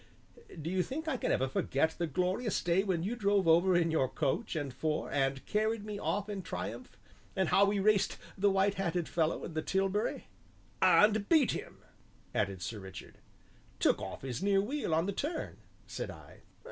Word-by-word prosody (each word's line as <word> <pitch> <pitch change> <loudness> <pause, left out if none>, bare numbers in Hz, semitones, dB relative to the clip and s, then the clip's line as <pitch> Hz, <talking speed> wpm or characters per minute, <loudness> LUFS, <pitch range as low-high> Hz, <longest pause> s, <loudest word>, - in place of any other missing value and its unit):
"Do 160 +3 -4
you 185 0 +2
think 305 - -4
I 315 - 0
can - - -1
ever 130 - +1
forget 140 +3 +1
the 170 - 0
glorious 185 - 0
day 175 +3 +2
when 180 -5 -1
you 215 +6 -2
drove 200 -4 +2
over 175 +2 +5
in 165 -1 +2
your 135 -5 +2
coach 155 - -1
and 145 -4 -3
four, 155 +2 -2
and 135 -1 0
carried 215 0 0
me 210 -1 -5
off 205 0 -1
in 205 -2 -4
triumph, 120 - -6 0.4
and 190 -3 +1
how 200 - +5
we 200 +1 +1
raced 200 0 +2 0.2
the 200 +1 +3
white 195 +1 +2
hatted 175 -2 -1
fellow 165 -1 0
in 170 - -7
the 155 - -1
tilbury 195 +4 -1 0.3
?" - - -31
"And 210 -1 +5
beat 310 -6 +5
him!" - - -7 0.5
added 100 -4 -1
Sir 110 +2 -4
Richard. 95 -1 -10 0.6
"Took - - +2
off - - -6
his 130 +3 -4
near 195 0 +3
wheel 245 - -2
on 165 +2 +2
the 200 - -1
turn," 310 - -3 0.3
said - - -5
I. - - -12
185 Hz, 190 wpm, -32 LUFS, 155-205 Hz, 0.6 s, over